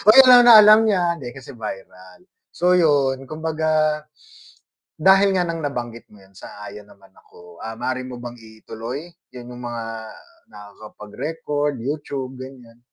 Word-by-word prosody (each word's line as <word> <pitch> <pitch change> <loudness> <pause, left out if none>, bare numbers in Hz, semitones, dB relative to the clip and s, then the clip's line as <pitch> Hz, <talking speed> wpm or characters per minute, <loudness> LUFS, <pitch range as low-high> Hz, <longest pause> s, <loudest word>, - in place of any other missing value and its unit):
oy, 265 - +9
alam 250 -1 +8
na 235 - +9
alam 215 +1 +7
niya, 195 -4 +1 0.2
hindi 130 - -8
kasi 135 +1 -11
viral 95 - -10 0.3
so 180 +1 0
yun 140 -6 +1
kumbaga 155 -1 -1 1.0
dahil 195 +4 +4
nga 180 - +1
ng 165 -1 -4
nabanggit 120 -4 -6
mo 105 -2 -18
yun, 95 0 -24
sang-ayon 105 0 -11
naman 100 -1 -21
ako, 85 -1 -18
ah, 115 0 -6
maari 130 +1 -3
mo 125 - -8
bang 120 0 -9
ituloy, 115 +7 -9 0.2
yun 125 -1 -10
yung 120 - -10
mga 120 -1 -5 0.7
nakakapagrecord, 135 +9 -6
YouTube 135 -2 -5
ganiyan. 125 -3 -12
130 Hz, 145 wpm, -21 LUFS, 115-155 Hz, 1.0 s, oy